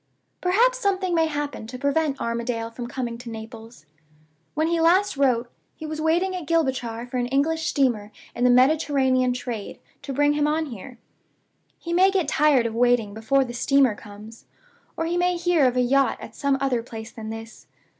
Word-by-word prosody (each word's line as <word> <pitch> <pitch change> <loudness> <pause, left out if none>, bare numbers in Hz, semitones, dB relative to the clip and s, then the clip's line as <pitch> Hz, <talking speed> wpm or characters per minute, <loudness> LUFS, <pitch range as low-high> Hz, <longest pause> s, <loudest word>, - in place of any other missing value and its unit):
"Perhaps 475 +8 +3
something 380 -5 0
may 325 -1 +3
happen 290 -6 -4
to 250 +2 -7
prevent 280 +1 0
Armadale 235 0 -3
from 240 +1 -6
coming 240 -2 -4
to 245 -1 -9
Naples? 225 -3 -10 0.7
When 310 +1 +1
he 335 0 +1
last 365 +4 +3
wrote, 250 -4 +1 0.2
he 315 - -8
was 310 0 -5
waiting 345 +4 +1
at 355 -4 -6
Gibraltar 260 -8 -1
for 250 +1 -5
an 245 0 0
English 315 +5 0
steamer 235 -7 0 0.2
in 240 - -3
the 250 - +5
Mediterranean 260 -1 +3
trade 240 -4 -5 0.2
to 275 - -6
bring 290 +2 +2
him 295 0 +1
on 315 +1 0
here. 240 +3 -10 0.8
He 340 - -5
may 370 +2 +5
get 380 -6 0
tired 295 -4 +3
of 230 - -2
waiting 240 -3 +2
before 245 +5 +1
the 240 - -7
steamer 270 0 +3
comes, 210 +2 -13 0.5
or 325 - -1
he 345 +1 -1
may 355 0 +1
hear 340 -5 +3
of 250 0 -1
a - - +4
yacht 270 +2 +2
at - - -10
some 280 -1 +1
other 265 -3 0
place 225 -1 -9
than 220 -1 -8
this. 225 0 -9
270 Hz, 185 wpm, -24 LUFS, 235-320 Hz, 0.8 s, the